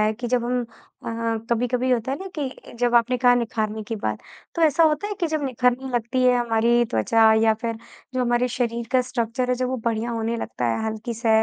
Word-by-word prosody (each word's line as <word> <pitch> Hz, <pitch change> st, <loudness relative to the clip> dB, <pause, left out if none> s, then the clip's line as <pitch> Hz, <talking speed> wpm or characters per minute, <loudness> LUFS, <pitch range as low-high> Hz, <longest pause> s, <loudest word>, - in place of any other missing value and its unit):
है 215 Hz, 0 st, +3 dB
कि 240 Hz, +3 st, -6 dB
जब 245 Hz, -1 st, +1 dB
हम 250 Hz, +1 st, 0 dB
अ, 230 Hz, 0 st, -5 dB
कभी-कभी 245 Hz, +2 st, +1 dB
होता 250 Hz, +1 st, 0 dB
है 280 Hz, -, -3 dB
ना 385 Hz, -, -7 dB
कि 275 Hz, -3 st, -6 dB
जब 245 Hz, 0 st, +1 dB
आपने 240 Hz, +2 st, +4 dB
कहा 245 Hz, 0 st, +5 dB
निखारने 220 Hz, -2 st, -2 dB
की 225 Hz, -, -2 dB
बात, 110 Hz, -, -2 dB, 0.4 s
तो 335 Hz, -, 0 dB
ऐसा 320 Hz, +1 st, +4 dB
होता 315 Hz, +5 st, +2 dB
है 415 Hz, -, -3 dB
कि 340 Hz, -, +2 dB
जब 310 Hz, -2 st, -2 dB
निखरने 255 Hz, 0 st, 0 dB
लगती 240 Hz, +2 st, 0 dB
है 250 Hz, -1 st, +5 dB
हमारी 235 Hz, 0 st, +2 dB
त्वचा 220 Hz, -, +3 dB
या 220 Hz, -, +5 dB
फिर 230 Hz, +1 st, -4 dB, 0.4 s
जो 255 Hz, -, 0 dB
हमारे 240 Hz, +1 st, +1 dB
शरीर 235 Hz, -1 st, -2 dB
का 255 Hz, -, +5 dB
स्ट्रक्चर 250 Hz, 0 st, -2 dB
है, 250 Hz, -, +2 dB
जब 250 Hz, 0 st, -2 dB
वो 260 Hz, -, -1 dB
बढ़िया 230 Hz, +1 st, -1 dB
होने 230 Hz, 0 st, -2 dB
लगता 125 Hz, -, -4 dB
है 115 Hz, -, -1 dB
हल्की 220 Hz, +2 st, -4 dB
से, 230 Hz, +1 st, -2 dB
240 Hz, 225 wpm, -23 LUFS, 225-255 Hz, 0.4 s, कहा